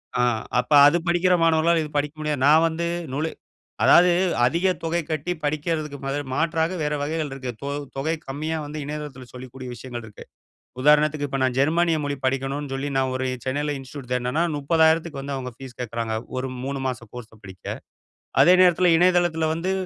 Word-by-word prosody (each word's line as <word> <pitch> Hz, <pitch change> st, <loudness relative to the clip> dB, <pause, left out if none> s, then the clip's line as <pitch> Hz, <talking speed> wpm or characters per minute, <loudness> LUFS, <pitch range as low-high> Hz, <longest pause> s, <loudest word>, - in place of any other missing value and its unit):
அ 125 Hz, -, +2 dB, 0.4 s
அப்ப 125 Hz, -, -3 dB, 0.2 s
அது 155 Hz, +4 st, +4 dB
படிக்கிற 175 Hz, +1 st, +3 dB
மாணவர்களால 165 Hz, 0 st, +3 dB
இது 150 Hz, -, -7 dB
படிக்க 145 Hz, +1 st, -1 dB
முடியாது 150 Hz, -3 st, -2 dB
நா 145 Hz, -, +6 dB, 0.2 s
வந்து 165 Hz, +1 st, -2 dB, 0.3 s
நுலு 155 Hz, +4 st, -1 dB, 0.6 s
அதாது 180 Hz, +1 st, +7 dB, 0.3 s
அதிக 170 Hz, +9 st, +1 dB, 0.2 s
தொகை 165 Hz, +1 st, 0 dB
கட்டி 155 Hz, +3 st, -1 dB
படிக்கறதுக்கு 150 Hz, 0 st, -2 dB
ம 135 Hz, -, -2 dB
து 145 Hz, -, -2 dB
மாற்றாக 165 Hz, +3 st, 0 dB
வேற 150 Hz, 0 st, -1 dB
வகைகள் 155 Hz, +1 st, -2 dB
இருக்கு. 130 Hz, -2 st, -5 dB
தொ 140 Hz, -, -3 dB, 0.3 s
தொகை 155 Hz, +4 st, -1 dB
கம்மியா 155 Hz, +4 st, -3 dB
வந்து 150 Hz, +1 st, -6 dB
இணையதளத்துல 145 Hz, -3 st, -7 dB
சொல்லிக்கூடிய 130 Hz, 0 st, -9 dB
விஷயங்கள் 120 Hz, 0 st, -7 dB
இருக்கு. 110 Hz, -2 st, -12 dB, 0.6 s
உதாரணத்துக்கு 150 Hz, +1 st, +3 dB
இப்ப 135 Hz, -, -3 dB
நா -, -, +4 dB
ஜெர்மனிய 165 Hz, +3 st, +2 dB
மொழி 145 Hz, 0 st, -2 dB
படிக்கனுன்னு 135 Hz, +2 st, -2 dB
சொல்லி 135 Hz, +2 st, -3 dB
நா -, -, +3 dB
ஒரு 130 Hz, 0 st, -1 dB, 0.2 s
சென்னையில 145 Hz, +3 st, -1 dB
இன்ஸ்டிடியூட் 130 Hz, -1 st, -10 dB
தேடுனனா 125 Hz, +5 st, 0 dB, 0.2 s
₹30,000க்கு 160 Hz, 0 st, +2 dB
வந்து 140 Hz, 0 st, -4 dB
அவங்க 130 Hz, -1 st, -5 dB
பீஸ் 130 Hz, -3 st, -10 dB
கேக்குறாங்க. 115 Hz, -1 st, -3 dB, 0.2 s
ஒரு 130 Hz, +1 st, -2 dB, 0.2 s
3 135 Hz, 0 st, -3 dB
மாசம் 120 Hz, -3 st, -5 dB
கோர்ஸ 125 Hz, -2 st, -9 dB
படிக்க. 95 Hz, -1 st, -13 dB, 0.8 s
அதே 180 Hz, -, +7 dB
நேரத்துல 180 Hz, -1 st, +5 dB
இணையதளத்துல 175 Hz, -2 st, +3 dB
வந்து 170 Hz, +4 st, -2 dB
145 Hz, 170 wpm, -23 LUFS, 130-160 Hz, 0.8 s, அதாது